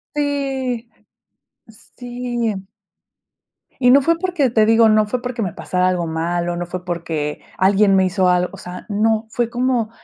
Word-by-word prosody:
Sí. 270 Hz, -5 st, -2 dB, 1.1 s
Sí. 240 Hz, -5 st, -3 dB, 1.1 s
Y 250 Hz, -1 st, +6 dB
no 280 Hz, +2 st, +7 dB
fue 330 Hz, +4 st, +1 dB
porque, 350 Hz, -8 st, +1 dB
te 220 Hz, -2 st, +3 dB
digo, 225 Hz, 0 st, +5 dB
no 215 Hz, 0 st, +4 dB
fue 245 Hz, +3 st, -2 dB
porque 245 Hz, -1 st, -4 dB
me 185 Hz, -5 st, -2 dB
pasara 180 Hz, 0 st, -1 dB
algo 180 Hz, -2 st, 0 dB
malo, 170 Hz, +2 st, -2 dB
no 175 Hz, -, -3 dB
fue 180 Hz, +1 st, -6 dB
porque 165 Hz, -4 st, -3 dB, 0.2 s
alguien 195 Hz, +1 st, +4 dB
me 190 Hz, -, +4 dB
hizo 185 Hz, 0 st, +1 dB
algo. 180 Hz, 0 st, +2 dB
O -, -, -11 dB
sea, 180 Hz, 0 st, -9 dB
no, 220 Hz, +2 st, +1 dB
fue 235 Hz, +1 st, -1 dB
como 245 Hz, -2 st, 0 dB
215 Hz, 160 wpm, -19 LUFS, 180-245 Hz, 1.1 s, no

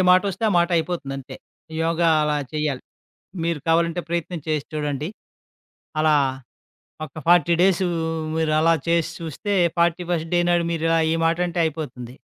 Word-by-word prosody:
మాటొస్తే 185 Hz, +3 st, +2 dB
ఆ -, -, +1 dB
మాటయిపోతుందంతే. 165 Hz, -6 st, -1 dB, 0.5 s
యోగా 165 Hz, 0 st, +2 dB
అలా 150 Hz, 0 st, +1 dB, 0.2 s
చేయాలి. 150 Hz, -4 st, -2 dB, 0.6 s
మీరు 170 Hz, -2 st, 0 dB
కావాలంటే 170 Hz, +1 st, +2 dB
ప్రయత్నం 170 Hz, 0 st, -3 dB
చేసి 155 Hz, -2 st, 0 dB
చూడండి. 150 Hz, +1 st, -2 dB, 0.9 s
అలా 155 Hz, -1 st, +4 dB, 0.9 s
ఒక 135 Hz, -, -16 dB
40 175 Hz, 0 st, +5 dB
డేసు 185 Hz, -1 st, +3 dB, 0.5 s
మీరలా 160 Hz, +1 st, +3 dB
చేసి 170 Hz, -1 st, +1 dB
చూస్తే, 165 Hz, +5 st, -4 dB, 0.2 s
ఫార్టీ 170 Hz, +1 st, +2 dB
ఫస్ట్ 165 Hz, 0 st, -2 dB
డే -, -, +4 dB
నాడు 175 Hz, -1 st, +2 dB
మీరు 165 Hz, -1 st, -3 dB
ఇలా 165 Hz, 0 st, +3 dB
ఈ -, -, +1 dB
మాట 165 Hz, +1 st, +2 dB
అంటే 175 Hz, 0 st, -3 dB
అయిపోతుంది. 140 Hz, -6 st, -5 dB
165 Hz, 135 wpm, -23 LUFS, 155-170 Hz, 0.9 s, 40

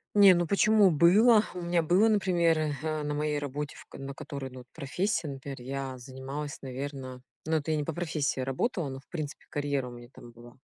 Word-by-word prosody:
Не, 200 Hz, -3 st, +8 dB
ну 175 Hz, -1 st, +1 dB
почему 205 Hz, +1 st, +5 dB
было. 210 Hz, +8 st, +6 dB
У 180 Hz, -, -5 dB
меня 170 Hz, 0 st, +2 dB
было, 185 Hz, +8 st, +4 dB
например, 175 Hz, -6 st, +3 dB, 0.2 s
э, 155 Hz, -1 st, -2 dB
на 150 Hz, 0 st, -2 dB
моей 150 Hz, 0 st, 0 dB
работе, 145 Hz, +1 st, -4 dB
в -, -, -13 dB
на 135 Hz, 0 st, -6 dB
которой, 140 Hz, -3 st, -6 dB
ну 130 Hz, -, -10 dB
вот, 125 Hz, -, -12 dB
профессия, 165 Hz, -, -1 dB
например, 135 Hz, 0 st, -6 dB
я 135 Hz, 0 st, -4 dB
занималась, 135 Hz, +3 st, -6 dB
наверно 130 Hz, -1 st, -6 dB, 0.2 s
ну 160 Hz, +1 st, 0 dB
это 155 Hz, +1 st, -1 dB
я -, -, +2 dB
не 150 Hz, -, 0 dB
по 165 Hz, -, -3 dB
профессии 155 Hz, -5 st, -1 dB
работала, 145 Hz, -, -1 dB
но 135 Hz, 0 st, -6 dB
в -, -, -31 dB
принципе 155 Hz, -4 st, -6 dB
карьера 145 Hz, -3 st, -1 dB
у -, -, -8 dB
меня 120 Hz, 0 st, -11 dB
там 120 Hz, -, -12 dB
была. 120 Hz, +1 st, -15 dB
150 Hz, 210 wpm, -29 LUFS, 135-175 Hz, 0.2 s, Не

